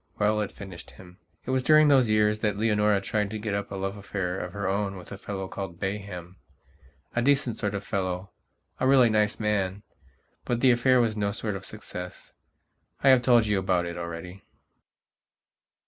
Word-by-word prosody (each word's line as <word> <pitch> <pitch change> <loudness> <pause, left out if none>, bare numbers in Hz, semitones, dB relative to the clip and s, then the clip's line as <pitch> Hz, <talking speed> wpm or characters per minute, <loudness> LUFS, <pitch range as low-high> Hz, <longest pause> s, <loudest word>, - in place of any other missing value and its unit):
Well, 105 +1 +2
it 105 - -3
finished 95 -4 -10
him. 90 +1 -15 0.3
It - - -2
was 130 0 +2
during 155 +2 +6
those 130 -5 +5
years 105 0 +3
that 105 -2 0
Leonora 105 -2 +2
tried 105 +1 -1
to 110 - -4
get 105 -1 -3
up 100 0 -2
a - - -4
love 95 +1 -3
affair 95 -2 -3
of 90 - -5
her 100 +1 -3
own 100 0 -1
with 90 - -12
a 100 - -6
fellow 95 -2 -5
called 95 -3 -6
Bayhama 95 -2 -5 0.8
decent 135 -2 +2
sort 100 -2 -2
of 100 - -4
fellow. 95 -2 -3 0.5
A 130 - +2
really 130 -4 +6
nice 105 -1 +1
man. 100 -2 -1 0.6
But 120 -1 -1
the 130 - +6
affair 125 +1 +4
was 115 -3 +1
no 100 -1 0
sort 105 -1 -3
of 95 0 -6
success. 90 -4 -8 0.7
I 135 - +6
have 130 -2 +6
told 120 -2 +4
you 105 -2 +1
about 90 -2 +1
it 85 0 -5
already... 85 +2 -7
100 Hz, 185 wpm, -27 LUFS, 95-110 Hz, 0.8 s, during